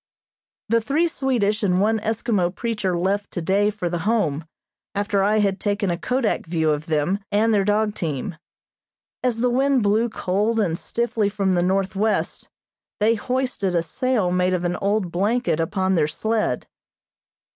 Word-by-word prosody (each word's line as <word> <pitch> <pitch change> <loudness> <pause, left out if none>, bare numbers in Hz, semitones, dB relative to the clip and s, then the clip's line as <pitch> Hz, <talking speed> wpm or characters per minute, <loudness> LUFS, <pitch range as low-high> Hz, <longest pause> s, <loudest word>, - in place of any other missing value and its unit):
The 230 +1 +2
three 295 +8 +1
Swedish 245 -9 0
and 185 -3 +2
one 220 +2 +2
Eskimo 215 -4 0
preacher 210 -6 -1
left 200 +3 -1
today 195 +4 +1
for 205 -4 -3
the 175 0 -2
Home, 165 -6 0 0.5
after 200 0 +1
I 210 +2 +3
had 200 -2 +1
taken 205 -2 0
a 170 - -1
kodak 250 -6 -1
view 160 -2 +1
of 150 +1 -2
them, 160 +5 +1
and 220 +2 +3
their 200 -2 +3
dog 210 +1 +1
team. 160 -1 -3 0.9
As 245 -3 0
the 250 - +3
wind 265 -1 +2
blew 215 +3 +2
cold 215 +3 0
and 175 -7 +1
stiffly 225 +2 -1
from 195 -2 0
the 175 - +2
northwest, 195 +3 0 0.5
they 215 +2 +4
hoisted 245 -5 -1
a 170 - +2
sail 215 +2 0
made 180 0 +2
of 175 - -3
an 175 0 0
old 200 -3 0
blanket 205 0 0
upon 190 +3 0
their 160 -4 +2
sled. 220 +7 -1
205 Hz, 160 wpm, -22 LUFS, 180-225 Hz, 0.9 s, they